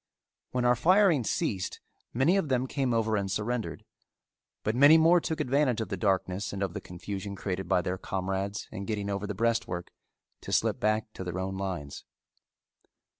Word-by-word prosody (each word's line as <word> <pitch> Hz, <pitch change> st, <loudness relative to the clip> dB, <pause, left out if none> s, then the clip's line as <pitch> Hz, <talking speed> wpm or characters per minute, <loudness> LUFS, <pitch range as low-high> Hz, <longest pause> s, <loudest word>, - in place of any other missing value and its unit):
When 125 Hz, -1 st, -1 dB
our 125 Hz, 0 st, +5 dB
firing 180 Hz, -, +4 dB
ceased, 95 Hz, -4 st, -2 dB, 0.3 s
many 135 Hz, +10 st, +3 dB
of 195 Hz, -7 st, 0 dB
them 130 Hz, -1 st, +1 dB
came 130 Hz, -1 st, -1 dB
over 110 Hz, -1 st, +1 dB
and 100 Hz, -2 st, -1 dB
surrendered, 110 Hz, +4 st, -3 dB, 0.8 s
but 110 Hz, -, 0 dB
many 145 Hz, +5 st, +8 dB
more 165 Hz, +2 st, +5 dB
took 160 Hz, -1 st, -3 dB
advantage 130 Hz, -2 st, +2 dB
of 110 Hz, -4 st, -3 dB
the 100 Hz, -, -2 dB
darkness 95 Hz, 0 st, 0 dB
and 100 Hz, 0 st, -3 dB
of 95 Hz, -3 st, -2 dB
the -, -, -5 dB
confusion 100 Hz, +3 st, -6 dB
created 95 Hz, -1 st, -4 dB
by 90 Hz, -, +3 dB
their 90 Hz, +1 st, -2 dB
comrades 95 Hz, +2 st, -3 dB
in 100 Hz, -, -5 dB
getting 105 Hz, -2 st, -2 dB
over 100 Hz, +1 st, -3 dB
the 105 Hz, -, -4 dB
breastwork 115 Hz, -5 st, -1 dB, 0.5 s
to -, -, -7 dB
slip -, -, +2 dB
back 110 Hz, 0 st, 0 dB
to -, -, -6 dB
their 90 Hz, 0 st, -4 dB
own 95 Hz, +1 st, -3 dB
lines. 90 Hz, -7 st, -5 dB
105 Hz, 175 wpm, -29 LUFS, 95-125 Hz, 0.8 s, many